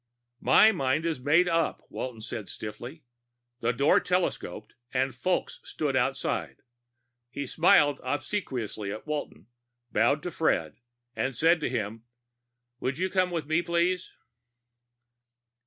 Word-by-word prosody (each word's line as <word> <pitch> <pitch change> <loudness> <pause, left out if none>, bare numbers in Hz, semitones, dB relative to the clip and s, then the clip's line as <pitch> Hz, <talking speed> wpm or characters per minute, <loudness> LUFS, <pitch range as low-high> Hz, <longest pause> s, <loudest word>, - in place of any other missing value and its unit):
"My 220 - +6
mind 145 -3 0
is 165 -5 -1
made 155 +7 +4
up," 165 -2 0
Walton 125 -4 -6
said 110 -1 -6
stiffly. 120 +8 -8 0.6
The 115 - +1
door 140 +5 +4
telescoped 140 - -2 0.2
and 130 +1 +1
Fulks 180 +9 -1
stood 145 -4 -2
outside. 130 +1 -1 0.7
He 140 +3 -4
smiled 145 -1 +4
obsequiously 130 - -3
at 105 - -7
Walton, 150 -1 -4 0.5
bowed 145 +1 +2
to 180 - -3
Fred, 80 - 0 0.4
and 135 -1 -1
said 165 +4 +4
to 150 - -1
him, 110 +1 -3 0.8
"Would 130 +1 -2
you 185 +1 -1
come 185 -1 +2
with 170 -3 -3
me, 155 +3 +2
please?" 175 +1 0
145 Hz, 125 wpm, -28 LUFS, 125-170 Hz, 0.8 s, My